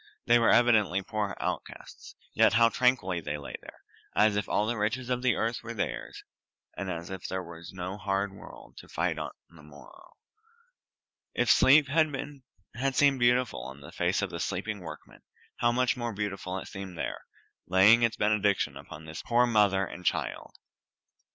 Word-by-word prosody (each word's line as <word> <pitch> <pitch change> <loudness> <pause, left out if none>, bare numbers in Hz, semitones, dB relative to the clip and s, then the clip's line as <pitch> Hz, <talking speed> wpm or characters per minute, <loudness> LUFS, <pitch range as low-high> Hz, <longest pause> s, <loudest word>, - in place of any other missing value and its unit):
They 120 0 +5
were 115 - +3
evidently 105 -6 +4
poor 105 -1 -3
outcasts, - - -6 0.2
yet - - +4
how 115 0 +5
tranquilly 115 -9 +1
they 75 -1 -4
lay 70 - -9
there, - - -14 0.3
as 105 -1 +4
if 105 - -2
all 105 - +1
the 120 +2 -1
riches 120 +4 -2
of 125 0 0
the 130 -1 +2
earth 115 +1 -1
were 115 0 -7
theirs, 105 - -4 0.5
and 100 - -4
as 85 0 -5
if 95 -2 -6
there 95 0 -3
was 85 -1 -10
no 95 +1 -5
hard 100 0 -1
world 100 - -13
to - - -12
fight - - -1
on - - -4 0.2
the 85 -2 -17
morrow. 75 -1 -16 1.2
If - - +3
sleep 145 +2 +6
had 155 +2 +2 0.8
seemed 140 -1 +4
beautiful 120 - +2
on 65 +3 -9
the 70 - -11
face - - 0
of - - -3
the - - -5
sleeping - - -3
workman, - - -11 0.4
how 120 - +2
much 125 -1 +1
more 120 -2 -4
beautiful 100 -2 -4
it - - -7
seemed 95 -2 -8
here, - - -4 0.5
laying 100 +6 +6
its 115 -1 +1
benediction 105 -1 +1
upon 80 +1 -11
this 80 0 -7
poor 120 +1 +3
mother 105 -4 +3
and 90 - -9
child. - - -2
105 Hz, 175 wpm, -28 LUFS, 95-120 Hz, 1.2 s, sleep